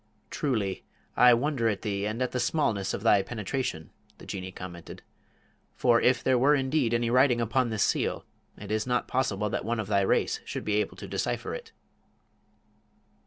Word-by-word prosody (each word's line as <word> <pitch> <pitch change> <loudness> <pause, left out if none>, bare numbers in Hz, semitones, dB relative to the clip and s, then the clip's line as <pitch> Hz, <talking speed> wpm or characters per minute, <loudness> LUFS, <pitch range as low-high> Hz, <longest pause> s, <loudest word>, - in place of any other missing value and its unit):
"Truly, 110 -10 -1 0.3
I 125 0 +7
wonder 125 -2 0
at 105 -3 -3
thee 100 -2 -2
and 115 +4 -2
at 125 - -2
the 125 - -2
smallness 115 -7 0
of 100 - -7
thy 105 -3 +5
penetration," 105 - -4 0.3
the - - -13
Jinnee 95 -1 -6
commented; 90 -2 -9 0.7
"for 120 -2 +3
if 125 -1 +3
there 130 -2 +3
were 145 +4 +5
indeed 135 -2 +1
any 120 0 0
writing 125 -1 +4
upon 120 +2 +1
this 110 -2 0
seal, - - 0 0.3
it 105 0 -8
is 110 +2 -1
not 125 0 0
possible 105 -6 -1
that - - -2
one 115 +2 -2
of 110 - -2
thy 100 0 +2
race 95 - +1
should - - -6
be 105 0 +1
able 105 - -1
to - - -8
decipher - - -3
it." - - -8
115 Hz, 180 wpm, -28 LUFS, 100-125 Hz, 0.7 s, I